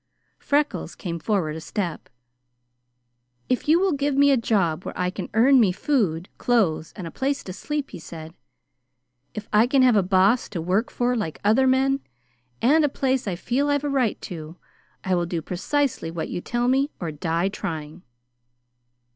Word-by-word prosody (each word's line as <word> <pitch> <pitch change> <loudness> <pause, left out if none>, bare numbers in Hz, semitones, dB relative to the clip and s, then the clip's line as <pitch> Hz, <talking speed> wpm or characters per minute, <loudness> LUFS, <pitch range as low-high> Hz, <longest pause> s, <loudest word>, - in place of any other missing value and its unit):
Freckles 290 +1 -1
came 170 -3 -5
forward 170 -5 -1
a 160 - -6
step. 170 -1 -4 1.4
"If 255 - 0
you 325 +2 +6
will 385 0 +2
give 285 -1 0
me 285 0 +6
a - - +5
job 195 -8 0
where - - -7
I 180 0 0
can - - -6
earn 260 +4 +6
me 210 -6 +4
food, 185 - 0
clothes, 190 -10 +1
and 185 - -7
a 165 - -6
place 275 +1 -2
to 185 - -7
sleep," 295 +7 -4
he - - -8
said, 160 0 -9 1.0
"if 210 0 -6
I 215 +3 +5
can 265 0 +3
have 250 -3 +5
a 205 - +5
Boss 190 +5 +3
to 190 - -4
work 185 +8 0
for 245 0 0
like 185 -9 -3
other 225 +6 +4
men, 270 +1 +3 0.6
and 300 +6 +5
a 295 - +3
place 265 -3 -1
I 185 - -1
feel 260 +10 -1
I've 285 0 +1
a 290 - -1
right 260 -6 0
to, 165 -3 -7 0.5
I 190 - 0
will 175 -1 +1
do 170 -1 -2
precisely 210 - -1
what 165 0 -4
you 175 - -4
tell 240 +4 -1
me 270 +3 +2
or 170 -3 -3
die 165 +4 -1
trying." 160 -4 -6
215 Hz, 180 wpm, -24 LUFS, 175-270 Hz, 1.4 s, you